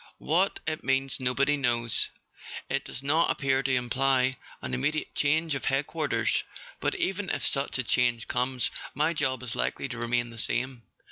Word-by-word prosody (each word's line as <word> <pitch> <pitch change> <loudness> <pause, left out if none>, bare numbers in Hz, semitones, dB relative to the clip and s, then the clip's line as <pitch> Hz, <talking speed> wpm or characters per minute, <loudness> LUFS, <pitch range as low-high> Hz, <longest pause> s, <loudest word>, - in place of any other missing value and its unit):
What 180 +6 +1
it 155 0 -3
means 135 +1 +1
nobody 135 +3 +2
knows. 120 -4 +2 0.6
It - - 0
does 130 - -7
not 155 +4 +3
appear 135 -1 +1
to 135 -1 +1
imply 130 +1 +2 0.3
an 65 -1 -6
immediate 150 - -1
change 155 +2 +2
of 140 - -3
Head¬ 135 +2 +1
quarters; 155 -2 0 0.4
but - - -1
even 190 0 -1
if - - -1
such 135 -1 +1
a 130 - 0
change 120 -1 +1
comes, 125 -2 -1 0.2
my 155 +4 +2
job 130 -5 -1
is 120 -1 -4
likely - - -1
to 120 -2 -6
remain 120 0 0
the 115 - -1
same. 125 +1 +2
135 Hz, 175 wpm, -28 LUFS, 125-145 Hz, 0.6 s, not